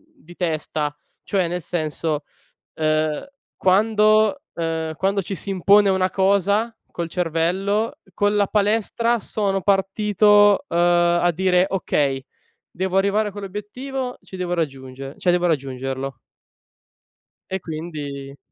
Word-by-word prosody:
di 175 - -16
testa. 155 -3 -2 0.3
Cioè 190 -4 0
nel 180 +1 -3
senso, 155 -2 -2 0.5
ehm, 155 -1 0 0.3
quando 215 +5 +3
ehm, 160 -1 -2
quando 195 +3 0
ci 195 +2 -5
si 200 - -5
impone 195 +2 +4
una 190 -1 +2
cosa 200 +4 +2 0.2
col 170 -1 -4
cervello 180 +6 0 0.2
con 205 0 +1
la 205 -1 +3
palestra 225 +3 +1
sono 195 -2 -1
partito, 205 +3 +4
uhm, 170 - -2
a 175 0 +3
dire: 180 +1 +2
"Okay 140 -8 0 0.5
devo 190 +1 -2
arrivare 200 +2 +2
a - - -8
quell'obiettivo, 230 +7 -5
ci 190 - -10
devo 180 -1 -2
raggiungere 135 -4 -5
cioè 180 - +2
devo 175 0 +2
raggiungerlo" 135 -3 -3 1.3
E 190 0 -2
quindi 145 -4 -6
185 Hz, 120 wpm, -22 LUFS, 160-205 Hz, 1.3 s, impone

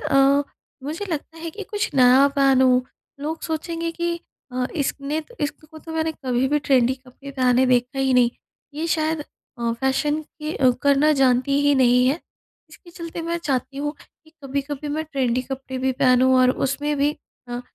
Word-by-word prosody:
अ 275 +1 +4 0.4
मुझे 315 +8 -4
लगता 320 +1 -5
है 330 0 -5
कि 415 +6 -8
कुछ 415 -1 -1
नया 260 +2 +6
पहनूँ। 260 -2 +4 0.4
लोग 315 +2 -4
सोचेंगे 330 +1 -3
कि 340 0 -2 0.4
अ, 250 0 -1
इसने 285 +1 -2
त 480 +10 -17
इसको 310 +2 -5
तो 320 +1 -9
मैंने 320 0 -1
कभी 250 +1 +1
भी 295 +1 +2
ट्रेंडी 260 -3 +2
कपड़े 265 +2 -13
डाले 255 0 +3
देखा 250 +2 +1
ही 265 -1 +2
नहीं। 245 -1 +4 0.4
ये 320 +2 -2
शायद 315 -1 0 0.4
अ, 235 -1 0
फैशन 295 +3 +1
के 305 +1 -7
अ, 260 -2 +4
करना 285 +2 +4
जानती 265 +2 +3
ही 285 0 +4
नहीं 250 -1 +4
है। 290 +6 +1 0.5
इसके 345 - -16
चलते 335 -1 -7
मैं 335 +1 -2
चाहती 275 -3 -2
हूँ, 295 +1 -2 0.3
कि 315 - -21
कभी-कभी 280 +2 -4
मैं 315 0 -2
ट्रेंडी 255 -4 -1
कपड़े 265 0 -6
भी 265 +1 +1
पहनूँ 255 +1 +4
और 255 - +5 0.2
उसमें 290 +2 -1
भी 285 +1 +2 0.4
अ, 240 0 -4
280 Hz, 175 wpm, -22 LUFS, 255-315 Hz, 0.5 s, नया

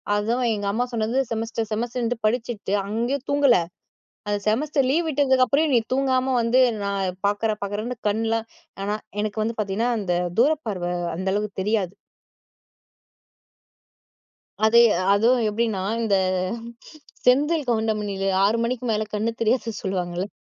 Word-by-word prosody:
அதுவும் 235 +4 0
எங்க 205 -1 -4
அம்மா 245 +4 0
சொன்னது 230 +3 0
செமஸ்டர் 225 0 -3
செமஸ்டர்ன்ட்டு 240 +1 -2
படிச்சுட்டு, 225 -3 -1
அங்கயும் 240 +6 -2
தூங்கல. 285 -5 +4 0.7
அந்த 205 0 0
செமஸ்டர் 275 +4 +1
லீவ் 330 +2 +1
விட்டதுக்கப்புற 270 0 +3
நீ 235 - +6
தூங்காம 260 -1 +1
வந்து 240 +3 +3 0.2
நான் 195 -2 -2
பார்க்குறேன். 210 +1 -1
பார்க்குறேன்னு 215 +5 -4
கண்லாம் 225 +1 -1 0.4
ஆனா 205 +1 -1 0.3
எனக்கு 215 0 -2
வந்து 230 +1 -2
பார்த்தீங்கன்னா 215 +4 0
அந்த 180 -3 -1 0.3
தூர 285 +6 +5 0.2
பார்வ 180 -4 -2 0.3
அந்தளவு 190 +3 -1
தெரியாது. 205 -3 0 2.7
அதே 235 +2 +6 0.3
அதுவும் 230 +3 +3
எப்பிடின்னா 215 -2 -1 0.2
இந்த 205 -3 +2 1.1
செந்தில் 290 +3 +3
கவுண்டமணில 215 -4 -1 0.2
6:00 215 +3 +3
மணிக்கு 250 +1 -2
மேல 215 0 +1
கண்ணு 215 +2 0
தெரியாது 230 +1 +1
சொல்லுவாங்கல்ல, 180 -1 -2
225 Hz, 120 wpm, -23 LUFS, 205-250 Hz, 2.7 s, நீ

